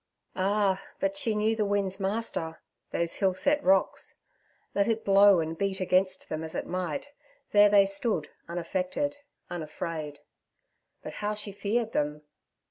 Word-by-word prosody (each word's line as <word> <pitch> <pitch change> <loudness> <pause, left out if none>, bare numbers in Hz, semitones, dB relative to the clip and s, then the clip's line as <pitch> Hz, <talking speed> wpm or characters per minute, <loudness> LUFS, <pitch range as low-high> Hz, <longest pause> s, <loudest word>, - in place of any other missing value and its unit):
Ah, 195 0 +1 0.2
but 295 0 0
she 230 -7 0
knew 215 +1 +2
the 220 - +1
wind's 200 -1 0
master—those 190 -5 -3
hill 190 -2 +2
set 285 +10 +2
rocks. 190 0 +2 0.6
Let 200 0 +2
it 225 -1 0
blow 200 -1 +7
and 160 0 -2
beat 195 +2 -1
against 185 0 +1
them 155 +1 -4
as 160 - -6
it - - -2
might, 180 - -3 0.4
there 205 0 +7
they 200 -1 +6
stood, 195 -5 -1 0.2
unaffected, 185 +11 -2 0.3
unafraid. 155 -2 -5 0.9
But - - -6
how 210 0 -1
she 210 -1 -4
feared 220 +3 -1
them! 150 +1 -1
195 Hz, 140 wpm, -28 LUFS, 175-210 Hz, 0.9 s, blow